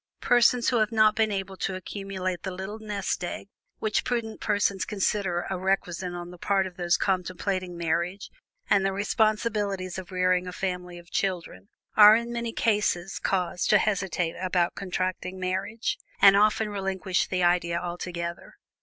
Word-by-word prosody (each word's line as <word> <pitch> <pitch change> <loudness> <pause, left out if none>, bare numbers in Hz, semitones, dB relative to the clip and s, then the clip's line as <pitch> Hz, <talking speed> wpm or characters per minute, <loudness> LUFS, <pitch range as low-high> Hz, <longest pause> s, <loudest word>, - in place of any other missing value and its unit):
Persons 245 0 +4
who 245 - +2
have 215 0 +1
not 215 -1 +4
been 220 -1 +2
able 195 -1 -3
to 190 - -2
accumulate 185 -2 -4
the 190 - -4
"little 190 +4 -6
nest 205 -4 -3
egg" 185 +2 -5 0.3
which 215 -1 0
prudent 230 -3 -3
persons 200 -2 +1
consider 195 -3 -1
a 190 -2 -3
requisite 185 -1 -1
on 175 0 -7
the 180 - -13
part 195 0 +1
of 185 -1 -8
those 175 -1 +1
contemplating 185 -1 -2
marriage 170 +4 -2 0.4
and 200 -1 +3
the 195 0 +1
responsibilities 205 -2 0
of 185 0 -10
rearing 185 0 +1
a - - -4
family 180 -2 -4
of 175 0 -14
children, 190 +1 -3 0.3
are 210 0 +9
in 235 +1 -2
many 235 -1 -2
cases 205 -5 0
caused 180 -2 -1
to 210 - +7
hesitate 190 -5 0
about 180 -2 +1
contracting 185 0 -3
marriage, 190 +5 -2 0.2
and 195 0 +8
often 210 +1 +3
relinquish 190 -2 -1
the 180 -1 -1
idea 175 -1 +2
altogether. 175 -1 -5
190 Hz, 160 wpm, -27 LUFS, 180-210 Hz, 0.4 s, are